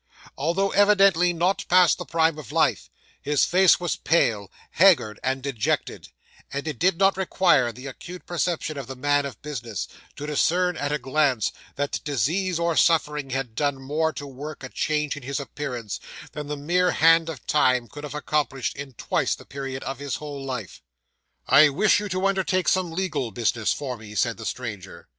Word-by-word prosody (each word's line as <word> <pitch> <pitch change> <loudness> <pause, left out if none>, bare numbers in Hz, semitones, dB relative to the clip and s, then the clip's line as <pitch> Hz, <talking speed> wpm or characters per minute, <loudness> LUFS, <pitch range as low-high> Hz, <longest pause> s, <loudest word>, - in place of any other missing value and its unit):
Although 175 +7 0
evidently 195 -4 +4
not 175 +3 0
past 180 -5 +5
the - - -5
prime 160 -1 +1
of 150 - -10
life, - - +1 0.3
his 145 -1 +2
face 185 0 +5
was 175 -2 -2
pale, 110 - +1 0.2
haggard, 165 - +4
and 130 0 -1
dejected; 130 -6 -2 0.4
and 140 +3 -4
it 150 -6 -4
did 180 -1 +2
not 195 0 +3
require 175 -9 +3
the 125 +4 -12
acute 175 +7 -9
perception 170 -3 -2
of 135 - -7
the 135 - -7
man 145 +2 +1
of 135 - -11
business, 120 - -5 0.3
to 145 - -6
discern 175 +4 +1
at 145 -1 -2
a 150 - +1
glance, 135 -3 +1 0.2
that 145 +1 -2
disease 160 - 0
or 170 -1 0
suffering 150 -4 +2
had 135 -3 -3
done 145 +3 -1
more 155 +4 -1
to 145 - -7
work 140 +2 -8
a 130 - -6
change 150 0 -1
in 145 - -8
his 140 +3 -3
appearance, 130 -6 -5 0.3
than 150 -1 -6
the 150 0 -4
mere 175 +5 +1
hand 165 0 +5
of 150 -7 -8
time 125 -5 +2
could 145 +3 -10
have 150 0 -6
accomplished 145 -3 -1
in 140 -1 -8
twice - - -1
the - - -15
period 135 -1 -6
of 135 +1 -5
his 145 -1 -3
whole 145 -2 -7
life. 125 -9 -6 0.7
'"I 150 +1 +7
wish 200 +11 +3
you 210 0 -5
to 185 +1 -1
undertake 190 -2 +1
some 185 -3 +2
legal 165 -8 -2
business 110 +1 0
for 130 -4 -3
me," 105 -1 -11
said 115 +1 0
the 115 - -6
stranger. 105 -7 -6
145 Hz, 185 wpm, -24 LUFS, 130-170 Hz, 0.7 s, I